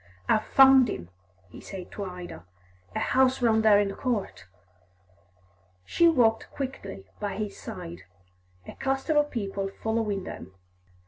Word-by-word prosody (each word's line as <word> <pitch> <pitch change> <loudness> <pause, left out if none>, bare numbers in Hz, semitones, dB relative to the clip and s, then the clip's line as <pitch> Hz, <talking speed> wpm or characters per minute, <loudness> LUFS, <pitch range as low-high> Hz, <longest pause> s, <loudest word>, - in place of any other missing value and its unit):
"I've 215 - +2
found 265 -2 +7
him," 85 - -6 0.4
he - - -11
said 185 -2 -9
to 205 - -5
Ida. 180 - -8 0.5
"A - - 0
house 260 0 +2
round 225 -3 +3
there 210 -2 +6
in 205 - +2
the - - -5
court." 220 - -3 1.4
She 340 - +3
walked 240 -8 +3
quickly 255 - -6
by 205 -2 -3
his 210 -1 -4
side, 85 +2 -8 0.6
a - - -8
cluster 270 +3 -1
of 295 0 +3
people 200 -5 -3 0.2
following 220 -3 -1
them. 95 - -9
220 Hz, 140 wpm, -27 LUFS, 195-265 Hz, 1.4 s, found